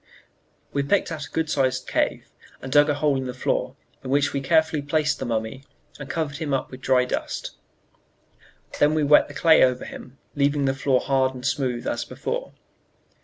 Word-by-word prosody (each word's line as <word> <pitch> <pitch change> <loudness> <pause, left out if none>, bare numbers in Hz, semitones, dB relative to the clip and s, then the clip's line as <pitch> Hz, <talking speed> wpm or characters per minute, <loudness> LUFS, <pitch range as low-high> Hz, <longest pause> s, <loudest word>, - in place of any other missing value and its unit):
We 140 - +1
picked 170 +6 +1
out 150 -3 -5
a - - -19
good 160 -1 -1
sized 130 -3 0
cave, - - -1 0.3
and 130 - -8
dug 145 +2 +5
a 145 - +2
hole 145 -1 +1
in 130 -1 -3
the 125 - -5
floor, 130 0 -1 0.3
in 130 - -6
which 140 +1 +2
we 140 - -1
carefully 160 +1 +2
placed 150 +1 0
the - - -3
mummy 110 +3 -3 0.4
and 140 0 -8
covered 145 -1 -2
him 145 -2 -1
up 135 - -4
with 130 0 -10
dry 130 -1 +3
dust; - - -4 1.3
then 150 +1 +4
we 155 - +1
wet 150 +1 +5
the 145 - -12
clay 160 0 +5
over 125 -1 +1
him, 130 +2 -10 0.2
leaving 145 0 +1
the 135 - +2
floor 135 -1 +1
hard 130 -1 +1
and 125 0 -8
smooth 130 -3 -1
as - - -2
before. - - -5
140 Hz, 195 wpm, -24 LUFS, 130-150 Hz, 1.3 s, dug